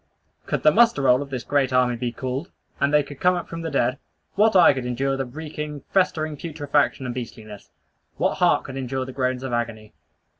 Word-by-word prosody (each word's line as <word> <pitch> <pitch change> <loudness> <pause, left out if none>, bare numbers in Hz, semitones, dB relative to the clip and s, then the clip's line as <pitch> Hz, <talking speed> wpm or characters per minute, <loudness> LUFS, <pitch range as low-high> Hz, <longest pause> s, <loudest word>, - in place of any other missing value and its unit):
Could - - -2
the 155 - +7
muster 230 -9 +4
roll 130 0 +4
of 140 - -6
this 130 -3 -4
great 140 -2 +1
army 125 -1 +3
be 120 0 -3
called, 130 +7 -4 0.3
and 140 +1 +2
they 150 -1 +4
could 145 -1 -11
come 180 0 +3
up 175 - -4
from 165 0 -6
the 165 - -3
dead, 130 -2 0 0.3
what 215 0 +3
eye 180 - +7
could 130 -2 -4
endure 135 +2 -1
the 135 0 -2
reeking, 150 +1 -6
festering 155 -5 +1
putrefaction 145 -4 0
and 125 - -3
beastliness! 110 -4 -8 0.5
What - - 0
heart - - +3
could 135 0 -8
endure 130 0 -3
the 130 - -8
groans 130 -1 -1
of 130 -2 -4
agony! 110 -2 -3
135 Hz, 210 wpm, -23 LUFS, 125-150 Hz, 0.5 s, the